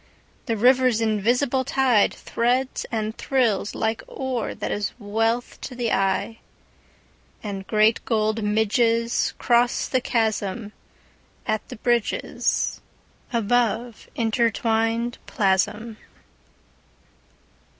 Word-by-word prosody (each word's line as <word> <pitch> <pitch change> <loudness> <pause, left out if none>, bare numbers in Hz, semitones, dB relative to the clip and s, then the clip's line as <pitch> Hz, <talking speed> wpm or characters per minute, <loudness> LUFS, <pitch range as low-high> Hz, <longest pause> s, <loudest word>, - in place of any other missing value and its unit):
The 230 -2 0
river's 250 0 +4
invisible 240 +5 +1
tideThreads 255 0 +1
and 220 -1 -2
thrills 235 -7 +1
like 220 0 -1
ore 260 -4 -3
that - - -4
is 205 -1 -2
wealth 225 +2 -1
to 250 - -7
the 240 -2 -1
eye. 195 +3 0 1.0
And 195 -2 -5
great 215 +1 +3
gold 220 -1 0
midgesCross 230 +3 +1
the 255 - +2
chasmAt 220 -2 -1 1.0
the - - -8
bridgesAbove 235 0 -1
intertwined 230 0 0
plasm. 210 +2 0
230 Hz, 80 wpm, -24 LUFS, 215-240 Hz, 1.0 s, river's